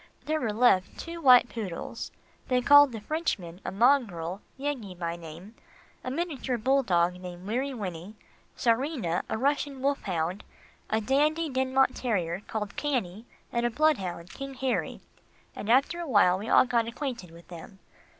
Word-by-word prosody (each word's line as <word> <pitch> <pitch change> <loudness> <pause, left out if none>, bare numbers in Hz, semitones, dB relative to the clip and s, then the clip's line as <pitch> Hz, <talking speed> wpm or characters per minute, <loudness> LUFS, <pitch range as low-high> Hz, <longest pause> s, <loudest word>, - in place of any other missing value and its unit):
There 310 0 -1
were 230 -4 0
left 210 -4 +3
two 335 0 -7
white 250 -4 +7
poodles, 205 -8 -6 0.4
they 250 -1 +2
called 285 +2 +7
the 225 - -6
Frenchmen, 210 - -3
a - - -4
mongrel, 200 -7 +1 0.2
Yeggie 260 -10 -4
by 170 -1 -3
name, 170 +5 -11 0.5
a - - -3
miniature 275 -4 -2
bull 265 +5 +2
dog 180 -4 +1
called 180 0 -9
Weary 255 +7 -1
Winnie, 190 -1 -6 0.4
Czarina, 235 - 0
a - - -1
Russian 280 +2 0
wolf 280 +1 0
hound, 175 +1 -2 0.5
a 220 0 +1
Dandie 300 +6 +1
Dinmont 260 0 +2
terrier 185 -8 -1
called 210 -2 -4
Cannie, 235 -7 -2 0.2
and 235 0 -1
a 240 - +2
bloodhound, 195 - 0
King 275 0 -7
Harry, 260 -1 -2 0.5
and 210 - -6
after 275 +8 +3
a 340 - -4
while 190 -5 +4
we 210 - -6
all - - +6
got 235 -2 +1
acquainted 235 - -5
with 170 +1 -16
them. 185 +4 -11
235 Hz, 160 wpm, -28 LUFS, 185-270 Hz, 0.5 s, white